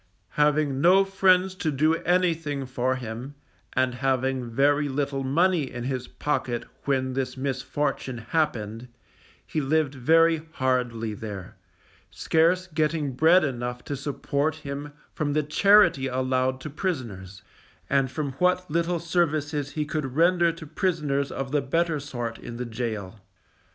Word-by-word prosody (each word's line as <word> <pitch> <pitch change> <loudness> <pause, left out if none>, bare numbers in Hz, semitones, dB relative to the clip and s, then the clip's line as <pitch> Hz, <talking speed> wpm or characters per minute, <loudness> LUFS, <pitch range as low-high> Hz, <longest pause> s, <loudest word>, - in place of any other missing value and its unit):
Having 150 -1 +1
no 190 +4 +6
friends 190 -1 +3
to 175 -4 -2
do 155 +3 +2
anything 165 -5 0
for 130 0 -1
him, 125 +3 -6 0.4
and 130 -1 +1
having 130 -1 -1
very 145 +4 +2
little 140 0 -2
money 160 +1 +2
in 120 -1 -5
his 130 -1 -3
pocket 130 -5 -2 0.2
when 130 -2 0
this 130 0 -3
misfortune 135 0 -2
happened, 115 -3 -2 0.6
he 155 - -2
lived 145 0 +1
very 160 +4 +4
hardly 125 -4 -1
there, 100 -3 -7 0.5
scarce 170 +3 +2
getting 155 -3 -1
bread 160 +7 +5
enough 125 -3 -3
to 145 - -4
support 145 +2 -1
him 145 -1 -6 0.2
from 145 -2 -1
the 155 0 +1
charity 195 -3 +4
allowed 130 0 0
to 155 - -6
prisoners, 110 - -4 0.4
and 135 -1 +2
from 145 +1 -3
what 180 -2 +1
little 170 +2 +1
services 155 -4 -1
he 155 -1 -1
could 145 -4 -3
render 170 +1 +4
to 165 -1 -10
prisoners 150 -4 -1
of 135 -1 -4
the 145 -1 +2
better 165 +3 0
sort 120 -5 -5
in 115 - -8
the 125 - -3
gaol. 110 -4 -4
140 Hz, 140 wpm, -26 LUFS, 130-160 Hz, 0.6 s, no